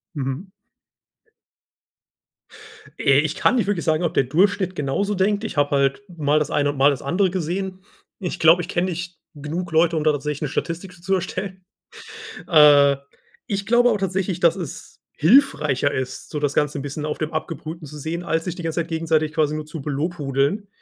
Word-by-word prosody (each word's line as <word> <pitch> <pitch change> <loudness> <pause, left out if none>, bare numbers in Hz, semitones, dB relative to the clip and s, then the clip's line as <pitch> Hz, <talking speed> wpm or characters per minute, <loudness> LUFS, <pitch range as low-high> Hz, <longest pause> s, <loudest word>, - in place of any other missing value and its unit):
Mhm. 135 +6 -4 2.5
Äh, 135 -1 +4
ich 155 0 -1
kann 255 - +2
nicht 235 -5 +1
wirklich 200 -5 -1
sagen, 160 +1 +1
ob 170 - 0
der - - +3
Durchschnitt 185 +6 +1
genauso 170 +9 -1
denkt. 200 +3 +1
Ich 220 - -5
habe 145 0 +2
halt 140 +5 +1
mal 150 -1 +2
das 150 - -2
eine 145 -1 +1
und 145 - -4
mal 140 +2 +5
das 135 - -4
andere 185 +7 +1
gesehen. 185 +2 -3 0.4
Ich 180 -3 -4
glaube, 165 +2 +6
ich - - -6
kenne 180 +1 0
nicht 175 -1 -6 0.2
genug 160 +5 -5
Leute, 165 +1 +3
um 155 - 0
da 155 - +4
tatsächlich 150 +1 -3
'ne - - 0
Statistik 175 +5 -3
dazu 175 -1 -17
zu 190 +3 +1
erstellen. 185 +1 -4 0.8
Äh, 145 -3 +6 0.5
ich 200 -1 -2
glaube 240 +2 +4
auch 220 - +1
tatsächlich, 190 -2 -2
dass 170 -2 +4
es 175 -7 -8
hilfreicher 150 - +3
ist, 130 -1 -4
so 150 - -4
das 145 -1 0
Ganze 150 0 0
'n - - -5
bisschen 145 +2 -5
auf 150 - -3
dem 155 +1 -3
Abgebrühten 155 0 -5
zu 150 - -10
sehen, 160 +4 -4
als 160 -1 -1
sich 180 -2 -3
die 175 - -8
ganze 165 +1 -1
Zeit 165 - -7
gegenseitig 160 -2 0
quasi 155 -1 +1
nur 155 0 -5
zu 155 -1 -7
belobhudeln. 145 +4 -1
160 Hz, 195 wpm, -22 LUFS, 150-185 Hz, 2.5 s, glaube